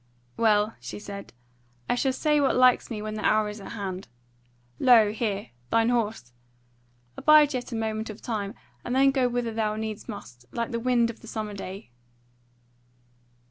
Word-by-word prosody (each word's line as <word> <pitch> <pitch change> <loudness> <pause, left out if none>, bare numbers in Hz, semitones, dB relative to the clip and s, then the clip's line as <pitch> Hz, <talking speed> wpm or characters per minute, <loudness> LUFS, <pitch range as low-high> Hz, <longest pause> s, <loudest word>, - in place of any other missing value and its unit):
"Well," 215 -1 +3
she - - -7
said, 200 -1 -8 0.6
"I - - +2
shall 260 +2 +1
say 300 +2 +2
what 275 - +2
likes 255 -1 +4
me 215 -3 -4
when 215 0 -4
the 215 - -5
hour 215 -1 +3
is 210 0 -8
at - - -8
hand. 190 -3 -5 0.7
Lo, 230 -5 +6
here! 210 - -2 0.2
thine 230 0 +3
horse. 220 - -1 0.8
Abide 305 -1 +6
yet 250 0 -4
a - - -3
moment 220 0 -2
of 215 - -8
time, 205 -4 -4 0.3
and 245 - -2
then 270 +1 +5
go 265 -2 +2
whither 240 -2 -2
thou 215 -1 0
needs 220 +1 -5
must, 125 - -9
like 235 +1 -3
the 235 - -1
wind 235 -1 +2
of 230 - -17
the 230 - -14
summer 215 -2 -4
day." 195 - -8
225 Hz, 175 wpm, -26 LUFS, 210-245 Hz, 0.8 s, Lo